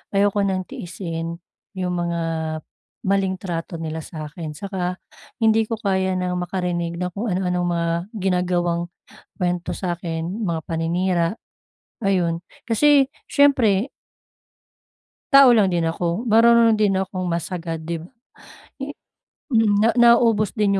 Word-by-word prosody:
ayoko 205 +1 +3
ng 185 -1 -1
tiisin 170 -1 -5 0.4
yung 180 -1 -2
mga 170 -1 -1 0.9
maling 195 -1 +1
trato 175 -2 -4
nila 160 0 -4
sa 155 -1 -7
akin 155 -1 -7
saka 185 0 -3 0.5
hindi 220 0 +4
ko 225 - -2
kaya 190 -3 0
ng 180 0 -1
makarinig 175 -1 -2
na 180 0 -2
kung 210 +6 -4
ano-anong 180 -1 0
mga 170 -1 0 0.3
ginagawang 180 -2 0 0.6
kuwento 180 -1 -1
sa 175 -2 -2
akin, 170 +5 -4
mga 165 -2 -1
paninira 170 +1 0 0.8
ayun, 175 -4 +1 0.3
kasi 275 +4 +4 0.2
siyempre 255 -6 +3 1.4
tao 275 -2 +9
lang 210 -3 +4
din 170 -2 +1
ako, 165 +2 -3 0.2
marunong 230 0 +6
din 205 -2 +3
akong 185 -1 -3
mas 170 -1 -1
agad 165 -2 -4
di 170 - -2
ba? 170 - -12 1.9
Naubos 230 -3 +4
din 200 -3 +2
180 Hz, 120 wpm, -22 LUFS, 170-205 Hz, 1.9 s, tao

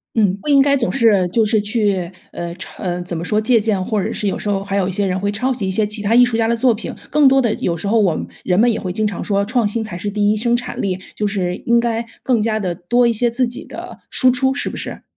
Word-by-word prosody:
嗯， 205 -5 +3
不 - - -8
应 280 -1 +5
该 280 0 +3
总 235 -4 0
是 215 -8 +3
就 220 +5 +2
是 215 0 +2
去， 205 -5 0 0.2
呃， 170 0 -5
抄 185 - -10 0.2
怎 175 -1 -5
么 160 - -4
说 210 +3 +1
借 230 +1 +3
鉴， 205 -3 0
或 210 0 -1
者 - - -2
是 210 - -3
有 195 - -1
时 - - -5
候 195 -1 -1
还 200 0 -3
有 190 -2 +1
一 - - -2
些 200 +2 0
人 185 0 -1
会 200 +1 0
抄 250 +6 -1
袭 220 -7 -3
一 - - 0
些 210 +2 +2
其 210 0 -2
他 210 +2 +1
艺 245 +1 +7
术 240 -2 0
家 225 -1 +1
的 235 - +1
作 240 0 +3
品， 215 - -5 0.2
更 295 -1 +5
多 270 0 +4
的 235 -3 +1
有 170 - -1
时 185 - -6
候 225 +2 +3
我 185 -6 +2
们 - - -4 0.2
人 180 0 +1
们 240 +3 +5
也 - - -3
会 185 - -4
经 215 +3 0
常 205 - -3
说： 200 -1 0
“创 230 0 +1
新 220 +2 -2
才 190 -5 -7
是 205 +3 -3
第 205 0 +1
一 215 - 0
生 235 +2 +2
产 245 0 -5
力。” 185 -2 -1 0.2
就 210 - -1
是 190 -3 -1
应 235 0 +4
该 235 -1 0 0.2
更 245 -4 +1
加 215 0 0
地 185 -4 -2
多 240 +9 +1
一 235 - +3
些 240 +2 +1
自 250 +2 0
己 240 +2 -5
的 - - -9
输 255 - +4
出， 265 +1 +1
是 - - -2
不 - - -7
是？ - - -6
215 Hz, 325 characters per minute, -18 LUFS, 195-235 Hz, 0.2 s, 艺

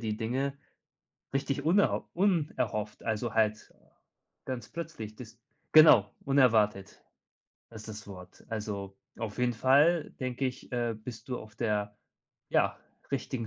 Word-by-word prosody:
die 110 -2 -2
Dinge 130 +5 -2 0.8
richtig 140 +1 -1
unerho 190 +5 +2
unerhofft, 155 - 0
also 110 0 -2
halt 110 -1 +1 0.7
ganz 125 -5 -5
plötzlich, 155 -11 -7
das 115 0 -11 0.4
genau, 140 -11 +8
unerwartet 110 -8 +2 0.7
ist 110 -1 -10
das 105 0 -8
Wort. 90 -2 -12
Also, 100 -3 -5 0.2
auf 110 -1 -5
jeden 125 0 +2
Fall, 145 +8 +4
denke 130 +1 -1
ich, 130 0 -7
äh, 120 -2 0
bist 115 +2 -9
du 125 - -2
auf 110 -1 -12
der, 105 -2 -1 0.5
ja, - - +2 0.3
richtigen 130 -3 -3
115 Hz, 125 wpm, -30 LUFS, 105-135 Hz, 0.8 s, genau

